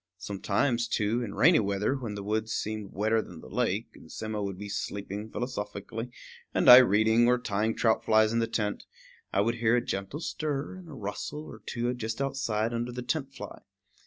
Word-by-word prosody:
Sometimes, 115 +5 0
too, 115 +2 0
in 110 -4 -5
rainy 165 +3 +6
weather, 100 +3 0
when 120 -6 -4
the 100 - -5
woods 110 +2 -1
seemed 110 -2 -3
wetter 110 +3 +1
than 85 -6 -11
the - - -12
lake, - - -1
and - - -15
Simmo 110 -1 -4
would 100 -2 -3
be 105 +2 -6
sleeping 100 +1 -4
philosophically, 115 -1 -4 0.5
and - - +2
I 125 - +13
reading, 110 0 +5
or 125 0 +4
tying 110 -1 -1
trout 110 -2 +2
flies 110 0 +4
in 115 - +2
the 115 - +1
tent, 105 -2 -2 0.4
I 100 - +2
would 115 +3 0
hear 115 0 +3
a 120 - 0
gentle 95 +9 -3
stir 150 -3 -3
and 185 -3 -11
a - - -9
rustle 130 +6 -5
or - - -11
two 120 0 -1
just 115 -1 -4
outside, 120 -5 -1
under 120 +1 -2
the 125 0 -5
tent 135 0 -2
fly. 105 -1 -8
110 Hz, 195 wpm, -29 LUFS, 105-125 Hz, 0.5 s, I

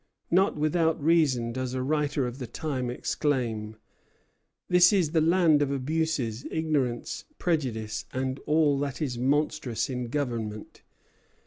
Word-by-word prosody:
Not 190 +1 +3
without 160 +2 +1
reason 145 -7 +2
does 130 +1 -3
a 130 - -1
writer 145 -1 0
of 125 +2 -5
the 125 - -5
time 130 0 -3
exclaim: 120 -5 -2 0.9
"This 180 0 +6
is 180 -7 +2
the 160 -1 +3
land 165 -2 +4
of 145 - +1
abuses, 140 -4 -1
ignorance, 145 -7 -1
prejudice, 120 -11 -2
and 130 +1 -2
all 150 -2 +3
that 140 -2 -3
is 125 -6 -2
monstrous 140 -2 0
in 125 -1 -3
government. 115 -6 -4
140 Hz, 130 wpm, -27 LUFS, 125-155 Hz, 0.9 s, This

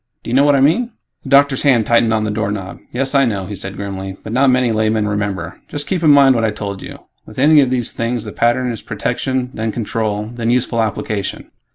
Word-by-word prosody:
Do - - -6
you - - -2
know 135 +2 +5
what 145 -1 +4
I 135 - +2
mean?" 185 - +2 0.3
The 135 - -9
doctor's 140 -1 +4
hand 125 -6 +3
tightened 115 -1 +3
on 110 -1 +1
the 105 - -1
doorknob. 105 -3 -4
"Yes, 135 +2 -2
I 140 -1 +4
know," 100 -6 -1
he 105 - -7
said 95 0 -5
grimly, 95 -1 -6
"but 110 - -6
not 135 +2 +4
many 125 -2 +2
laymen 110 -1 +1
remember. 100 -5 -3
Just 145 0 -5
keep 185 -3 -2
in 160 - +4
mind 140 -2 +6
what 115 -2 0
I 110 - +2
told 100 -2 -6
you. - - -10 0.3
With 110 - -13
any 150 +3 +5
of 130 - +1
these 125 -2 -1
things, 115 -1 -2
the 105 - -7
pattern 120 +3 +1
is 115 - -6
protection, 130 -1 -2
then 110 0 -2
control, 110 -1 -3
then 115 -1 -2
useful 120 -1 +1
application." 105 -2 -3
115 Hz, 235 wpm, -17 LUFS, 105-130 Hz, 0.3 s, mind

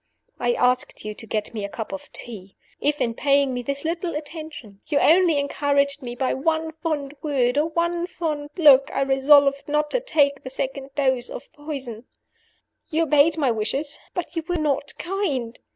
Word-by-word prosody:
I 240 0 +1
asked 250 -3 0
you 215 - -4
to 225 - -11
get 215 +1 -2
me 215 -3 -4
a 200 - -3
cup 220 +1 -6
of 195 - -7
tea. 200 -5 -3 0.2
If, 295 0 0
in 230 - 0
paying 280 +1 +2
me 250 - -2
this 280 +4 -4
little 335 +1 -2
attention, 295 - -7
you 295 - +1
only 335 +1 +5
encouraged 280 0 +1
me 240 -2 -6
by 260 +1 0
one 320 +3 0
fond 305 -3 -3
word 260 -5 +1
or 310 +2 +1
one 340 +1 -1
fond 300 -5 -3
look, 280 -5 +7
I 275 - -1
resolved 275 +1 +4
not 300 0 0
to - - +1
take 290 - +2
the 260 - -6
second 270 +1 -5
dose 260 -4 +1
of - - -9
poison. 270 -6 -6 0.8
"You 325 0 +1
obeyed 300 +1 +4
my 280 -5 +2
wishes, 270 +7 -2 0.2
but 350 -2 -4
you 330 - -2
were 355 - -1
not 285 -2 -1
kind. 295 - -2
285 Hz, 185 wpm, -23 LUFS, 255-315 Hz, 0.8 s, look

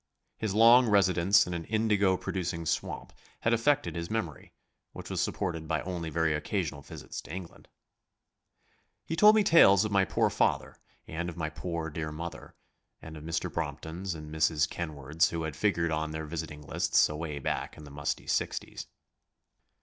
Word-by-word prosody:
His 105 -3 -2
long 120 +3 +7
residence 100 -1 +4
in 90 - -5
an 85 -1 -4
indigo 105 -4 +2
producing 85 -3 -3
swamp - - -3 0.3
had 115 - +2
affected 140 +3 +1
his 85 0 -4
memory, 85 -10 -4 0.4
which - - -8
was - - 0
supported 80 -2 -2
by 80 -2 0
only 85 -3 -4
very 80 0 +1
occasional 75 -1 -2
visits - - -8
to - - -12
England. 90 0 -8 1.4
He 165 - -3
told 210 +5 +7
me 215 - +4
tales 105 - +6
of 110 - -3
my 100 -1 +3
poor - - +1
father - - 0 0.3
and 85 +2 -4
of 85 - -9
my 80 -2 -3
poor, 85 -3 -4
dear 80 0 -4
mother, 85 +2 -8 0.4
and 80 0 -10
of 75 - -9
Mr. 80 +1 -2
Bromptons 85 +3 -4
and 75 -1 -9
Mrs. 80 -1 +2
Kenwards 75 -2 -1
who 85 -1 -3
had 80 -3 -4
figured 85 -2 +1
on 80 0 -1
their 80 0 -5
visiting 75 -1 -6
lists 70 - +2
away 75 -1 -5
back 70 - -3
in 75 - -11
the 75 - -11
musty 75 +1 -3
sixties. - - -2
85 Hz, 170 wpm, -29 LUFS, 80-95 Hz, 1.4 s, long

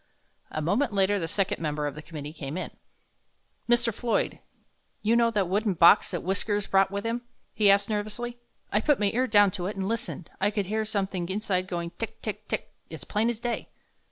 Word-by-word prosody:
A 155 - -3
moment 210 - +1
later 200 +1 +3
the 165 - -2
second 195 +1 -1
member 150 -1 -1
of 145 - -2
the 155 - -8
committee 150 -1 -7
came 145 0 -5
in. 185 - -4 1.0
"Mr. 240 -1 +3
Floyd, 235 +2 -1 0.6
you 220 +2 +3
know 235 0 +4
that 205 -5 0
wooden 200 +1 +1
box 170 +5 +6
that 175 - -3
'Whiskers' 200 +2 0
brought 195 0 +3
with 200 +2 -4
him?" 230 +1 -1 0.3
he 210 -2 +4
asked, 200 +1 +5
nervously; 220 +3 -3 0.3
"I 210 - +2
put 295 +4 +3
my 205 -1 +2
ear 255 +3 +2
down 205 -3 +5
to 180 -1 -3
it 205 - -4
and 195 -1 -2
listened. 220 -6 -4
I 200 - +4
could 205 -1 -1
hear 215 +3 -1
something 195 -4 -2
inside 190 -2 -1
going 170 -2 -3
tick, - - -5
tick, - - -5
tick, - - -3 0.2
as - - -8
plain 220 +2 0
as 235 -2 -3
day." 240 0 -3
200 Hz, 205 wpm, -27 LUFS, 185-220 Hz, 1.0 s, box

